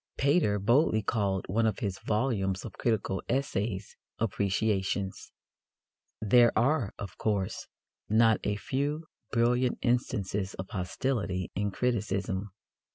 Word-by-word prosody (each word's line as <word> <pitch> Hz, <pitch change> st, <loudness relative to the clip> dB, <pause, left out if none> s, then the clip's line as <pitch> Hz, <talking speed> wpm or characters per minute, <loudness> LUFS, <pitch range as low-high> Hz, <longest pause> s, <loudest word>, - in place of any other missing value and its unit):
Pater 140 Hz, -7 st, +3 dB
boldly 110 Hz, +2 st, +3 dB
called 100 Hz, -3 st, 0 dB
one 110 Hz, +4 st, +2 dB
of 110 Hz, -, 0 dB
his 100 Hz, -2 st, -3 dB
volumes 105 Hz, -5 st, 0 dB
of -, -, -7 dB
critical 100 Hz, -5 st, -1 dB
essays 105 Hz, -6 st, -1 dB, 0.2 s
Appreciations. 100 Hz, -2 st, -1 dB, 0.9 s
There 120 Hz, +2 st, +5 dB
are, 120 Hz, -2 st, +2 dB
of 100 Hz, -, -8 dB
course, 100 Hz, -4 st, -1 dB, 0.4 s
not 110 Hz, +1 st, +5 dB
a 105 Hz, -, 0 dB
few 145 Hz, +8 st, -2 dB, 0.3 s
brilliant 120 Hz, +2 st, +2 dB
instances 105 Hz, -6 st, 0 dB
of 95 Hz, 0 st, -6 dB
hostility 95 Hz, -1 st, -2 dB
in 100 Hz, +1 st, -1 dB
criticism. 100 Hz, -3 st, -1 dB
105 Hz, 110 wpm, -29 LUFS, 95-120 Hz, 0.9 s, There